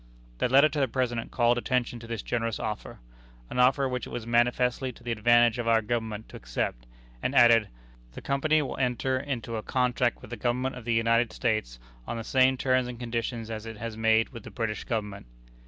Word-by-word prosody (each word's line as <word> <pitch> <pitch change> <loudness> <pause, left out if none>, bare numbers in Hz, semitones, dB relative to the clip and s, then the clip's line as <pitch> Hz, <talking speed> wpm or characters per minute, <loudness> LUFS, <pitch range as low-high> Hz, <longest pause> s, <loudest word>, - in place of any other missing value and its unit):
The - - +1
letter 140 +4 +6
to 150 0 -3
the 135 - +2
President 120 -3 -2
called 120 0 +2
attention 120 -1 -1
to 115 - -11
this 115 -3 -4
generous 115 -2 -2
offer 105 -1 -5 0.5
an - - -2
offer 135 +2 +4
which 125 -1 -3
it - - -9
was 120 - -5
manifestly 120 +2 +1
to - - -18
the 120 - -3
advantage 120 +1 +4
of 120 - -3
our 115 -1 +4
Government 110 -1 -3
to - - -12
accept - - -4 0.3
and - - -2
added: 115 -3 +6 0.4
"The - - -8
Company 155 +3 +2
will 135 - -5
enter 130 0 0
into 120 -5 -4
a - - -3
contract 125 0 0
with - - -12
the 120 - -4
Government 125 +3 -1
of 125 -2 -9
the 120 - 0
United 115 0 +2
States 110 - -1 0.3
on 115 - -3
the 115 - -4
same 130 +2 +3
terms 130 -1 +1
and 120 -1 -7
conditions 115 -1 -3
as 110 0 -6
it 115 -1 -7
has 115 0 -5
made 110 0 +3
with 115 - -9
the - - -10
British 110 -3 -3
Government." 105 - -4
120 Hz, 210 wpm, -27 LUFS, 115-125 Hz, 0.5 s, letter